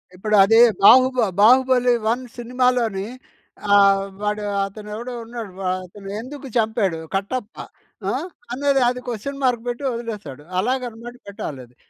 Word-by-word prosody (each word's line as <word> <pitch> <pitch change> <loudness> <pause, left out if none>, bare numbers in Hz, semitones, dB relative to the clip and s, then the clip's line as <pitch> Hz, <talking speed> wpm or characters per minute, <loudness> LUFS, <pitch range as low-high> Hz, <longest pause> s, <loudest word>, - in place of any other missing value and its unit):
ఇప్పుడు 215 +3 0
అదే, 225 +3 +5 0.2
బాహుబ 255 +4 +7 0.2
'బాహుబలి 250 +2 +5 0.2
1' 250 +2 -3
సినిమాలోని 240 -4 0 0.7
ఆహ్, 195 -1 +5 0.2
వాడు 210 0 -2 0.2
అతను 210 +2 -10
ఎవడో 240 +3 -6
ఉన్నాడు. 230 -3 -8
వ - - -6 0.2
అతను 195 +2 -11
ఎందుకు 275 +4 -8
చంపాడు? 215 -7 0 0.2
కట్టప్ప. 210 +3 -3 0.5
ఆ! - - 0 0.4
అన్నది 275 +2 +1
అది 250 0 -4
క్వెషన్ 245 +4 -5
మార్క్ 245 -3 +1
పెట్టి 245 +3 -4
వదిలేసాడు. 210 - -7 0.2
అలాగనమాట 240 +1 -3
పెట్టాలది. 130 -11 -8
230 Hz, 125 wpm, -21 LUFS, 200-250 Hz, 0.7 s, బాహుబ